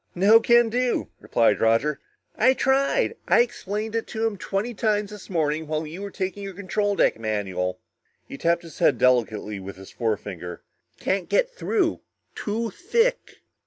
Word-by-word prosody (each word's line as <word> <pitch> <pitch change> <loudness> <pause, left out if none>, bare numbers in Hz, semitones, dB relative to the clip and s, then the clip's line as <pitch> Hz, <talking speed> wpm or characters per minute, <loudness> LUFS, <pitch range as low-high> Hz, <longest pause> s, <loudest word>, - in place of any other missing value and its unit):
"No 205 +5 +6
can 235 0 +4
do," 245 +2 0
replied 115 -3 +2
Roger. 115 +7 +2 0.4
"I 255 +4 +4
tried. 275 - +2
I - - +6
explained 220 -2 -3
it 225 - -1
to 225 +1 -2
him 225 -2 0
twenty 200 +5 -3
times 210 -1 0
this 210 -2 -10
morning 160 -3 0
while 155 +1 -2
you 165 +5 -8
were 200 - -5
taking 190 +1 -4
your 195 -2 -6
control 200 +2 -1
deck - - +2
manual." 95 -4 -2 0.5
He - - -8
tapped 170 +4 +1
his 165 -3 -12
head - - +4
delicately 110 -5 +1
with 95 +1 -8
his 95 0 -12
forefinger. 95 -6 -4 0.4
"Can't 190 -1 -1
get - - +2
through 415 -8 0 0.3
too 225 +1 -3
thick!" 470 - 0
195 Hz, 160 wpm, -24 LUFS, -, 0.5 s, No